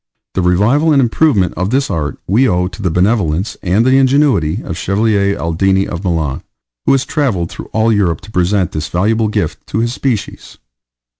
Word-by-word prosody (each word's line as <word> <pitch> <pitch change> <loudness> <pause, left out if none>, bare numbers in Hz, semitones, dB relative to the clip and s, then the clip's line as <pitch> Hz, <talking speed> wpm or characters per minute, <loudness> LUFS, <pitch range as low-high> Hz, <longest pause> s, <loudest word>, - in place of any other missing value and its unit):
The 95 - 0
revival 105 - +2
and 145 - +4
the - - +4
improvement 115 - +2
of 90 +3 -2
this 135 -1 0
art 75 -5 -3
we 120 +8 +2
owe 90 -1 +1
to 95 +3 -10
the 95 - 0
benevolence 90 0 0
and 100 +6 +1
the 130 +1 +4
ingenuity 135 - +2
of - - -11
the - - -2
Chevalier 100 +2 0
Aldini 95 +4 +1
of 85 +2 -6
Milan, 80 -7 -1 0.5
who - - +5
has 135 - +1
travelled 115 - -1
through - - -9
all 110 +1 +2
Europe 95 -6 0
to 110 - -13
present 90 -1 0
this 75 0 -4
valuable 110 +6 0
gift 105 - -3
to - - -4
his 120 +1 0
species. 125 -6 -4
100 Hz, 195 wpm, -15 LUFS, 90-115 Hz, 0.5 s, who